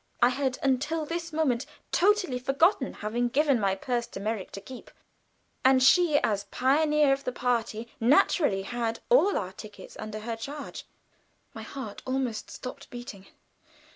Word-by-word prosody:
I 240 - +6
had 260 0 -1
until 290 +4 0
this 335 +1 -4
moment 285 -5 0 0.2
totally 375 -9 +2
forgotten 270 - +2
having 235 +4 -2
given 280 -1 +2
my 195 -2 +1
purse 240 +3 -2
to - - -8
Merrick 210 -1 -3
to - - -5
keep; 255 +5 -11 0.7
and 260 0 +5
she, 305 +2 +5
as 205 -2 0
pioneer 295 +4 +3
of 275 +1 -3
the 255 - -2
party, 235 -2 -1
naturally 235 - +3
had 230 +2 -3
all 445 -5 +5
our 185 -2 -3
tickets 210 +1 -11
under 215 0 -6
her 230 +1 -3
charge. 280 +6 -7 0.7
My - - -8
heart 225 -7 -7
almost 255 -4 -2
stopped 255 - -8
beating. 240 -6 -9
255 Hz, 150 wpm, -28 LUFS, 225-290 Hz, 0.7 s, I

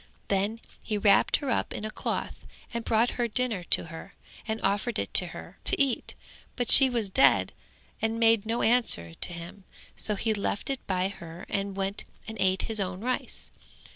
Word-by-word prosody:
Then 200 +3 0 0.2
he 215 - -3
wrapped 205 0 +4
her 280 -3 -4
up - - -1
in 210 - -5
a 215 - -5
cloth - - -5 0.3
and 235 0 -3
brought 225 +2 +2
her 240 - +1
dinner 230 -4 -2
to - - +3
her 165 +4 -11 0.3
and 220 0 -3
offered 205 +4 0
it - - -4
her - - +1
to - - 0
eat, 275 -3 -1 0.4
but 245 -2 0
she 270 -1 +11
was 235 -4 -1
dead 265 - +3 0.5
and 225 +1 -1
made 225 -2 +4
no 225 +2 -2
answer 220 - +2
to - - -2
him, 175 +3 -10 0.3
so 210 - -1
he 220 +2 -1
left 205 +4 -3
it 270 - -3
by 185 0 0
her 170 -2 -10
and 200 -1 -3
went 195 +1 -3 0.2
and 220 - -7
ate 190 0 +1
his 220 -1 -3
own 185 -1 -3
rice. 250 +2 -4
215 Hz, 185 wpm, -27 LUFS, 195-230 Hz, 0.5 s, she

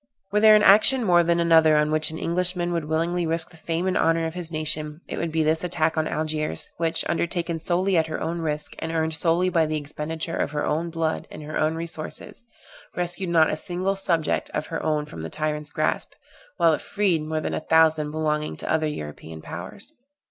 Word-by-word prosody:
Were 210 - +2
there 215 0 +8
an 210 - +4
action 225 +6 +6
more 175 -3 +5
than 170 0 +1
another 160 -2 +5
on 150 0 +2
which 155 0 +2
an 160 - -6
Englishman 175 +1 -1
would 165 -2 -2
willingly 165 +2 0
risk 165 +1 -1
the - - -16
fame 165 +2 -2
and 185 - 0
honor 165 0 +2
of 160 - -3
his 175 -2 -3
nation, 155 0 +1
it - - -5
would 170 -1 -2
be 160 0 +1
this 160 +2 +1
attack 165 -2 0
on 155 -1 0
Algiers, 155 0 -2
which, 165 -1 0
undertaken 170 0 -1
solely 185 +3 +1
at 160 -1 +2
her 155 - -4
own 170 +1 -3
risk, 150 -2 -3
and 160 - -4
earned 160 -1 0
solely 165 +3 +3
by 165 -3 +2
the 155 0 -1
expenditure 155 +3 -4
of 145 - -2
her 150 - -1
own 160 +3 -1
blood 165 -1 -2
and - - -9
her 155 +1 -6
own 155 +1 +1
resources, 165 +5 -7 0.5
rescued 175 +1 -1
not 165 -2 +4
a - - 0
single 185 +4 -2
subject 170 -5 0
of 150 - -1
her - - -2
own 150 -1 0
from 85 - -9
the 80 - -5
tyrant's 150 -1 -3
grasp, - - -1 0.4
while 165 -1 +4
it - - -2
freed 195 -6 0
more 155 +1 -2
than - - -3
a - - -1
thousand 160 -1 +3
belonging 150 0 -2
to - - -4
other 155 -1 +1
European 80 - -7
powers. 95 - -6
160 Hz, 215 wpm, -24 LUFS, 155-170 Hz, 0.5 s, there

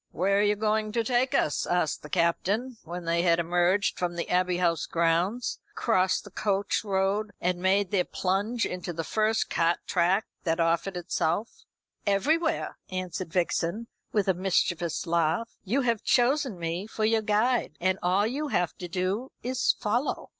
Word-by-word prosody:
"Where 195 +4 +1
are - - +4
you 210 0 +3
going 215 0 0
to 230 -1 +1
take 245 +2 +1
us?" 150 - +1
asked 175 -4 0
the 150 - -10
Captain, 200 +9 0
when 175 +1 -6
they 170 0 +1
had 170 -1 +3
emerged 175 +3 +1
from 175 -1 -1
the 170 - -3
Abbey 180 0 +2
House 170 -3 +1
grounds, 170 +8 0 0.2
crossed 190 -5 +1
the 205 - -12
coach 200 0 0
road, 200 +1 0
and 180 0 0
made 190 0 +2
their 190 -3 +2
plunge 200 +8 -1
into 180 -1 -4
the 165 0 -3
first 215 +7 0
cart 170 +1 +2
track 185 +4 +2 0.2
that 165 -1 0
offered 170 +3 +1
itself. 175 +3 -2 0.4
"Everywhere," 310 - +1
answered 185 -2 -4
Vixen, 180 +4 0 0.3
with 205 -3 +1
a 190 - +4
mischievous 175 -2 0
laugh. 170 +6 0
"You 240 +8 +1
have 235 -4 0
chosen 255 -3 +2
me 170 +4 -3
for 220 0 -2
your 225 0 +3
guide, 220 +4 +1
and 185 +2 +1
all 185 +3 +2
you 280 +7 -2
have 180 - 0
to 180 - -5
do 190 +8 -2
is 255 +1 +2
to - - -27
follow." 235 +7 -1
190 Hz, 170 wpm, -27 LUFS, 175-220 Hz, 0.4 s, are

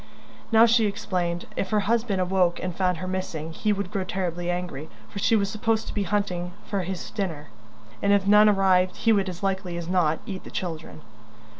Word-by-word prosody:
Now, 225 0 +7
she 230 -1 +4
explained, 180 -4 -2
if 190 - -2
her 210 0 +2
husband 220 -1 0
awoke 180 -1 +2
and 180 -2 -4
found 180 -2 +1
her 185 - -5
missing 165 -4 -4
he 210 +5 0
would 200 -2 -2
grow 200 -3 -1
terribly 175 -2 -3
angry, 175 -4 -4 0.2
for 200 - -7
she 225 - +3
was 200 -2 +2
supposed 220 +1 0
to - - -5
be 205 - -1
hunting 180 -2 -1
food - - -22
for 200 -2 0
his 185 0 -5
dinner, 165 -8 -4 0.5
and 200 - +2
if 200 -1 +3
none 210 +1 +7
arrived 185 -2 +3
he 225 -1 +3
would 200 -2 +1
as 180 +1 -8
likely 190 -2 -1
as 170 -1 -5
not 170 -4 +2
eat 190 -5 -6
the - - -10
children. 160 -3 -5
190 Hz, 205 wpm, -25 LUFS, 175-205 Hz, 0.5 s, Now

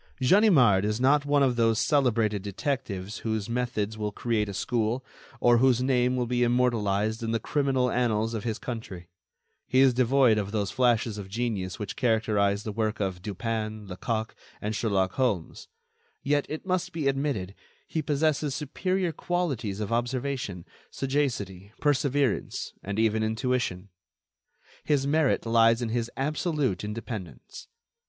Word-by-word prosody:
Ganimard 130 - +5
is 105 +2 -1
not 145 +3 +3
one 145 -1 +4
of 125 -3 +2
those 115 -1 +3
celebrated 115 -8 +2
detectives 100 -2 -3
whose 110 -2 -2
methods 115 -3 -2
will 105 -1 -2
create 105 -1 -1
a - - -5
school, 120 +4 -1 0.3
or 120 -1 +5
whose 125 -1 +3
name 125 -1 +2
will 125 -1 0
be 120 +1 -1
immortalized 110 -3 +1
in 115 0 -2
the 115 - +1
criminal 130 -1 +1
annals 115 -2 +1
of 110 - -3
his 115 -2 -2
country. 110 -8 -7 0.6
He 130 - +2
is 135 -1 +6
devoid 125 -2 +4
of 100 -1 -3
those 105 -3 -1
flashes 115 -4 +1
of 95 -1 -8
genius 105 -4 -2
which 105 - -5
characterize 105 -4 +1
the 110 - -4
work 110 +1 -1
of 95 -3 -2
Dupin, 110 +1 -3
Lecoq 110 +4 -3 0.3
and 105 +1 -3
Sherlock 95 -5 +1
Holmes. 105 -10 -2 0.6
Yet, 145 0 +1
it 155 +4 -5
must 185 -1 -1
be 155 -4 -1
admitted, 135 -9 -1 0.3
he 160 - -2
possesses 150 -1 0
superior 180 +5 -1
qualities 140 - -2
of 105 +1 -2
observation, 125 -5 -2 0.2
sagacity, 110 -9 -2
perseverance 140 -4 0
and 100 +1 -4
even 110 0 +2
intuition. 110 -4 -1 0.9
His 145 -3 +1
merit 145 -2 +2
lies 115 0 +4
in 120 -2 -2
his 115 0 -1
absolute 150 - -1
independence. 105 - -7
115 Hz, 145 wpm, -27 LUFS, 105-135 Hz, 0.9 s, is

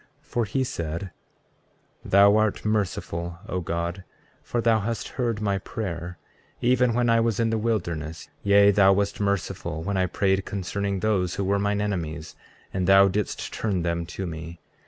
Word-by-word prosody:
33:4 - - -31
For 120 -2 0
he 130 +5 0
said: 85 -4 -4 0.9
Thou 100 +1 +6
art 110 -1 +1
merciful, 85 -5 -2
O 90 - -2
God, 85 +2 -3 0.4
for 120 - -3
thou 115 -1 +3
hast 115 +2 -3
heard 120 -4 -2
my 100 -2 0
prayer, 90 -4 -5 0.4
even 125 -1 +3
when 120 0 +2
I 115 0 +4
was 115 -2 +1
in 115 -1 +2
the 115 - +1
wilderness; 85 -8 -2
yea, 100 0 +6
thou 95 -1 +5
wast 100 +1 -1
merciful 95 -5 -2
when 100 +2 -1
I 95 -1 +2
prayed 95 +1 +1
concerning 100 0 -3
those 95 -5 +1
who 100 - -1
were 100 +1 +1
mine 100 0 0
enemies, 85 -6 -3 0.4
and 95 -1 -1
thou 95 0 +7
didst 100 +1 -3
turn 95 -6 -1
them 85 0 -1
to 95 +2 -5
me. 80 0 -7
100 Hz, 170 wpm, -25 LUFS, 85-105 Hz, 0.9 s, thou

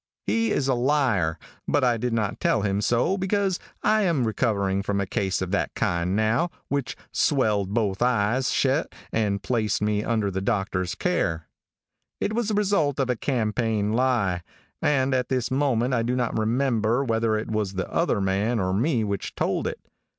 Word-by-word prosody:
He 230 0 +1
is 140 -9 0
a 135 - +3
liar; 120 - +1 0.3
but 145 - +2
I 120 -2 +3
did 125 +2 -2
not 110 -3 -1
tell 110 - +1
him 100 0 0
so 120 - +1
because 190 -1 0 0.2
I 215 0 +3
am 170 -9 +2
just - - +1
recovering 100 -4 0
from 100 0 -1
a 100 - 0
case 95 0 -1
of 95 - -5
that 100 - -1
kind 85 +2 0
now, 110 +11 +2 0.2
which 140 -4 -2
swelled 105 -9 +1
both 105 -4 0
eyes 125 +1 +2
shet 140 +4 +1 0.2
and 100 -3 0
placed 110 -1 0
me 105 0 0
under 110 -4 0
the 95 +1 -2
doctor's 95 -4 -1
care. 80 -1 -1 0.7
"It 215 - -1
was 235 -1 0
the 215 - 0
result 195 -10 +1
of 130 -2 +1
a - - 0
campaign 110 -3 0
lie, 115 -8 +1 0.4
and 135 -2 +2
at 125 -1 0
this 125 -3 -1
moment 130 -2 +1
I 115 - +2
do 120 +2 0
not 125 -2 -1
remember 115 +1 +1
whether 115 -2 +1
it 110 - -4
was 105 -3 -1
the 95 -1 -3
other - - 0
man 100 +5 0
or 95 -1 0
me 120 +3 +1
which 100 -1 -3
told - - 0
it. - - -4
115 Hz, 185 wpm, -25 LUFS, 100-130 Hz, 0.7 s, a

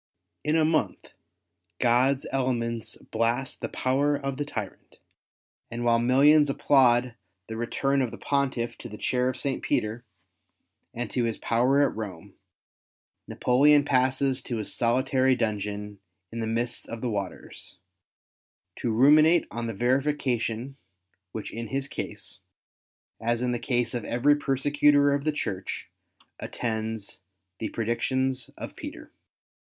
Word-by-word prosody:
In 150 +1 +1
a 160 -1 +4
month, 155 0 -1 0.7
God's 130 +3 +3
elements 120 -4 -1
blast 115 +4 -2
the - - -3
power 140 +3 +1
of 135 -2 -4
the 145 - -2
tyrant; 110 -8 -7 0.7
and 120 +1 -4
while 115 0 +4
millions 140 +5 +5
applaud 125 -3 +3 0.3
the 110 - -7
return 135 +4 0
of 125 - 0
the - - -9
Pontiff 135 -4 -1
to 120 - -8
the 105 - -8
Chair 125 +2 0
of 130 - -4
St. 135 -1 -2
Peter 110 +3 -1 0.9
and 120 0 -4
to 125 -2 0
his 115 -2 -2
power 125 +5 +2
at - - -6
Rome, 100 -7 -7 0.9
Napoleon 145 +3 +4
passes 130 0 +1
to 120 -2 -4
his 105 - -3
solitary 130 +2 +2
dungeon 105 -3 -3 0.3
in 115 - -5
the 110 - -2
midst 120 +2 -2
of 115 -1 -6
the 125 - -1
waters, 100 -3 -6 1.0
to 120 - -2
ruminate 150 +8 +5
on 120 0 -4
the 115 - -3
verification 130 0 0 0.5
which 110 - -6
in 115 0 -5
his 135 +5 -2
case, - - -6 0.8
as 120 +1 0
in 125 - +1
the 120 - -1
case 120 -1 0
of 120 -3 -3
every 140 +5 +3
persecutor 145 +1 +3
of 140 +1 -2
the 155 - +2
Church, 100 -10 -4 0.5
attends 110 -2 -4 0.4
the 110 - -3
predictions 130 +3 -1
of - - -7
Peter. - - -9
125 Hz, 135 wpm, -27 LUFS, 115-135 Hz, 1.0 s, millions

